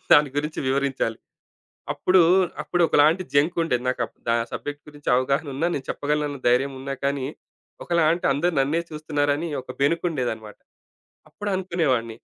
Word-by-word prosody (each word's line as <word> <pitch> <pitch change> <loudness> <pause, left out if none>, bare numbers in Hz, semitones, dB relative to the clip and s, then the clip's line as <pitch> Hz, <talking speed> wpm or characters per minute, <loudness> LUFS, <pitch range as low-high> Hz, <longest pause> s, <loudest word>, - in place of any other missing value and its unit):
దాని 145 -2 +6
గురించి 150 +1 -2
వివరించాలి. 135 -4 0 0.8
అప్పుడు, 185 -1 +4 0.4
అప్పుడు 175 - 0
ఒకలాంటి 155 +5 +4
జంకు 155 +5 +3
ఉండేది. 125 -6 0
నాకు 125 - -2
అప్ - - -21 0.2
ఆ - - +2 0.2
సబ్జెక్ట్ 145 0 -5
గురించి 145 -1 -16
అవగాహన 135 +3 +1
ఉన్న, 145 - -3
నేను 135 - -5
చెప్పగలను 150 +1 0
అని 140 -2 -7
ధైర్యం 135 +3 +3
ఉన్నా‌ 135 +1 -4
కానీ 140 -1 0 0.6
ఒకలాంటి 170 0 +2
అందరూ 170 +5 0
నన్నే 155 +5 +1
చూస్తున్నారని, 150 0 -1
ఒక - - -9
బెనుకుండేదన్నమాట. 130 - -1 0.7
అప్పుడునుకునేవాడిని. 170 - -1
145 Hz, 135 wpm, -24 LUFS, 135-165 Hz, 0.8 s, దాని